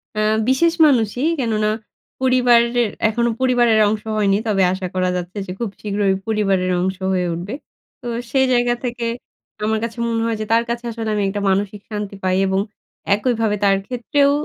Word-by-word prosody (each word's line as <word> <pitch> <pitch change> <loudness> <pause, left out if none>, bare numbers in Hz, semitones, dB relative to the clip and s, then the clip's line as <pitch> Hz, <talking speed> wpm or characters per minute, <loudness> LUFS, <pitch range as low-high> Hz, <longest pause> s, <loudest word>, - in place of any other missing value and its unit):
হুম, 215 0 +2 0.2
বিশেষ 325 +6 +3
মানুষই, 245 -2 +2
কেননা 215 -4 0 0.5
পরিবারের 245 -2 +3 0.2
এখনো 235 +2 0
পরিবারের 240 -3 +3
অংশ 210 0 -1
হয়নি। 200 -2 +3
তবে 195 -3 +2
আশা 190 -1 -4
করা 185 0 +1
যাচ্ছে 180 +2 -5
যে, - - -5
খুব 235 -3 -2
শীঘ্রই 200 -1 0
পরিবারের 195 -4 +1
অংশ 190 +1 -1 0.2
হয়ে 180 -1 0
উঠবে। 175 +6 -5 0.5
তো 245 - -7 0.2
সেই 265 -1 +3
জায়গা 240 0 +2
থেকে 240 -1 -3 0.6
আমার 220 0 +1
কাছে 230 0 -4
মনে 230 -1 0
হয় 230 -1 0
যে, - - -2
তার 230 +1 +4
কাছে 235 0 -3
আসলে 225 -1 -4
আমি 205 - 0
একটা 205 +1 -3
মানসিক 200 +1 -1
শান্তি 205 -1 -4
পাই, 185 0 +1
এবং 190 0 +1 0.6
একইভাবে 225 -1 0
তার 195 -1 +5
ক্ষেত্রেও 280 +3 +1
220 Hz, 170 wpm, -20 LUFS, 200-240 Hz, 0.6 s, তার